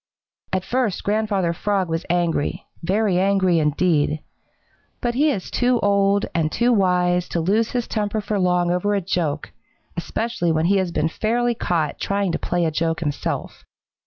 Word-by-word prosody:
At 185 -1 0
first 240 -4 -1
Grandfather 205 -4 0
Frog 195 +1 0
was 165 0 -3
angry, 170 -4 0 0.2
very 190 +1 +1
angry 190 -3 +3
indeed. 150 0 +1 0.8
But 240 -1 -1
he 295 +5 +3
is 200 -10 -3
too 245 -1 +2
old 200 0 +3
and 155 -2 0
too 240 +6 +2
wise 180 -3 +2
to 170 - -1
lose 210 +7 +1
his 245 -2 -1
temper 210 0 -1
for 210 -1 -2
long 180 -1 +2
over 205 +4 +1
a 200 - 0
joke, 165 -5 -2 0.4
especially 175 0 -1
when 160 0 +1
he 195 +3 +3
has 185 -2 0
been 155 -1 +1
fairly 235 +7 0
caught 165 -9 -1
trying 200 -2 0
to - - -2
play 175 -1 0
a 160 - 0
joke 165 +1 -1
himself. 145 -3 -3
185 Hz, 165 wpm, -22 LUFS, 170-210 Hz, 0.8 s, angry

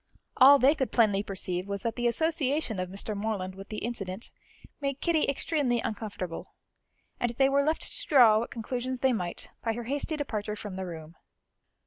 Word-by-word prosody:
All 275 +2 +9
they 275 +2 +5
could 265 -5 -2
plainly 210 -4 +3
perceive 185 -2 -3
was 200 -1 -4
that 230 -1 -1
the 240 0 0
association 290 - 0
of 185 0 -3
Mr. 200 +3 -3
Morland 200 -3 -2
with 195 +1 -11
the 215 0 -4
incident 205 -3 -4 0.5
made 275 -1 -2
Kitty 330 -3 +2
extremely 280 -3 0
uncomfortable, 200 -6 -5 0.6
and 240 - +1
they 270 +2 +4
were 280 +1 +3
left 310 +3 0
to - - -2
draw 240 -8 +7
what 235 - -3
conclusions 250 +2 -4
they 265 -1 +3
might 180 -6 -4
by 225 - 0
her 240 +1 -5
hasty 285 +5 -2
departure 215 -7 -3
from 205 -2 -7
the 190 -1 -4
room. 160 -1 -9
230 Hz, 180 wpm, -28 LUFS, 200-275 Hz, 0.6 s, All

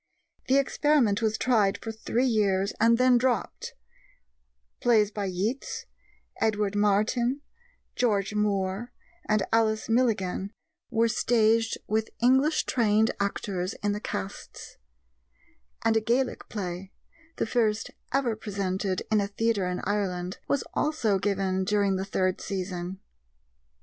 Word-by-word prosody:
The 265 - +4
experiment 275 -6 +2
was 220 -1 +1
tried 215 -6 +2
for 225 - -6
three 225 +3 -1
years 200 -5 +1
and 230 +1 +5
then 250 0 +5
dropped; 250 -1 -1 1.0
plays 215 -4 +3
by 205 -1 -3
Yeats, 195 +8 -3 0.6
Edward 210 -2 +1
Martyn, 215 +6 +1 0.5
George 210 -4 +1
Moore, 205 +2 -1 0.4
and 215 -2 +3
Alice 220 -1 +2
Milligan 210 -4 0 0.4
were 230 +1 +2
staged 225 -1 +2
with 220 +1 -1
English 265 +6 +3
trained 220 -2 +2
actors 195 -2 -2
in 205 - +2
the 205 - -2
casts; 95 - -7 1.1
and 225 - +3
a 225 - +3
Gaelic 245 +4 -1
play 185 -2 -5 0.4
the - - -1
first 225 -2 0 0.2
ever 255 -4 +1
presented 195 -2 -2
in 215 -1 +4
a 200 - -1
theatre 205 -2 0
in 180 0 -3
Ireland 185 -3 -2
was 280 - +1
also 235 -10 +1
given 190 -1 0
during 200 0 +1
the 190 +1 -2
third 185 -1 0
season. 185 -1 -4
210 Hz, 125 wpm, -27 LUFS, 195-230 Hz, 1.1 s, and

